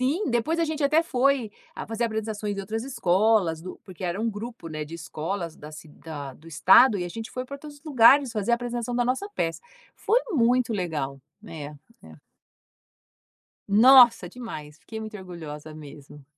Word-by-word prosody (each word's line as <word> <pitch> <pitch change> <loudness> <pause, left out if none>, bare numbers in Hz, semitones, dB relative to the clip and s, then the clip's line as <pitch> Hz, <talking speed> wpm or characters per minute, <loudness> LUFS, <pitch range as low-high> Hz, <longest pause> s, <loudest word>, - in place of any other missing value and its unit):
Sim, 290 +10 0
depois 240 +8 0
a 335 - +2
gente 310 -1 -3
até 305 +3 +4
foi 260 -6 +1 0.2
a - - -7
fazer 225 +1 -2
apresentações 220 -2 -3
em 195 - -3
outras 220 +4 -4
escolas 195 -7 +1
do 185 - -9
porque 185 -1 -12
era 180 +2 -2
um 230 - 0
grupo, 220 -3 -7
né, 155 -1 -5
de 160 +3 -10
escolas 170 +1 -5
da 150 - -11
ci 155 +1 -11
da 145 -3 -9
do 165 - -16
estado 195 - +6
e 180 - -2
a - - -5
gente 225 +5 -7
foi 255 0 -5
pra 280 +2 -8
todos 290 0 -12
os 285 - -33
lugares 275 -2 +5
fazer 215 0 -2
a - - +6
apresentação 240 0 -4
da 245 - +1
nossa 260 +12 -1
peça. 165 -1 -2 0.3
Foi 470 - +2
muito 245 -4 +2
legal. 150 -9 -3 0.3
É, 155 -3 -7 0.4
é. 80 -1 -14 1.5
Nossa, 235 -1 +7
demais! 160 -10 -9
Fiquei 220 +7 -8
muito 215 -1 -7
orgulhosa 160 -5 -9
mesmo. 145 -1 -12
215 Hz, 185 wpm, -25 LUFS, 165-245 Hz, 1.5 s, Nossa